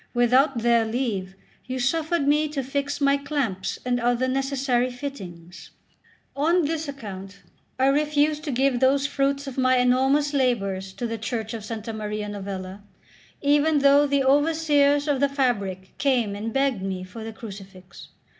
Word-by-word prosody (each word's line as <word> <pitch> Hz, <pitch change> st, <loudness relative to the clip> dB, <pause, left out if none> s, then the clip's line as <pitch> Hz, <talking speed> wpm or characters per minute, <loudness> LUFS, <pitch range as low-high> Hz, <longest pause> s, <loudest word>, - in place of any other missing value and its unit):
Without 255 Hz, +3 st, +3 dB
their 235 Hz, -1 st, +4 dB
leave 220 Hz, -5 st, -3 dB, 0.3 s
you 255 Hz, 0 st, -3 dB
suffered 310 Hz, +4 st, 0 dB
me 300 Hz, +1 st, +3 dB
to 290 Hz, -2 st, -3 dB
fix 280 Hz, +2 st, -3 dB
my 280 Hz, -1 st, +3 dB
clamps 270 Hz, -10 st, -3 dB
and 245 Hz, -1 st, 0 dB
other 245 Hz, +2 st, +1 dB
necessary 265 Hz, -2 st, 0 dB
fittings." 190 Hz, -10 st, -9 dB, 0.7 s
On 330 Hz, +4 st, +2 dB
this 315 Hz, +1 st, -2 dB
account 200 Hz, -8 st, -8 dB, 0.3 s
I 260 Hz, -, +2 dB
refused 300 Hz, +2 st, +2 dB
to 295 Hz, -, -2 dB
give 260 Hz, 0 st, +1 dB
those 270 Hz, +2 st, +3 dB
fruits 280 Hz, 0 st, 0 dB
of 270 Hz, -1 st, -5 dB
my 255 Hz, 0 st, +3 dB
enormous 265 Hz, +4 st, +2 dB
labours 200 Hz, -8 st, 0 dB
to 240 Hz, -, -5 dB
the 230 Hz, -1 st, -4 dB
church 220 Hz, 0 st, -4 dB
of 220 Hz, -2 st, -7 dB
S. 220 Hz, -2 st, -5 dB
Maria 210 Hz, -1 st, -4 dB
Novella, 195 Hz, -1 st, -6 dB, 0.6 s
even 295 Hz, +2 st, +3 dB
though 280 Hz, +1 st, +5 dB
the 280 Hz, -1 st, +1 dB
overseers 290 Hz, 0 st, +3 dB
of 285 Hz, -3 st, +1 dB
the 280 Hz, +1 st, +2 dB
fabric 200 Hz, -9 st, -2 dB
came 245 Hz, -7 st, +1 dB
and 220 Hz, +3 st, -4 dB
begged 270 Hz, -5 st, 0 dB
me 190 Hz, -1 st, -4 dB
for 200 Hz, +5 st, -9 dB
the 225 Hz, -, -6 dB
crucifix. 195 Hz, -4 st, -11 dB
255 Hz, 155 wpm, -24 LUFS, 215-280 Hz, 0.7 s, though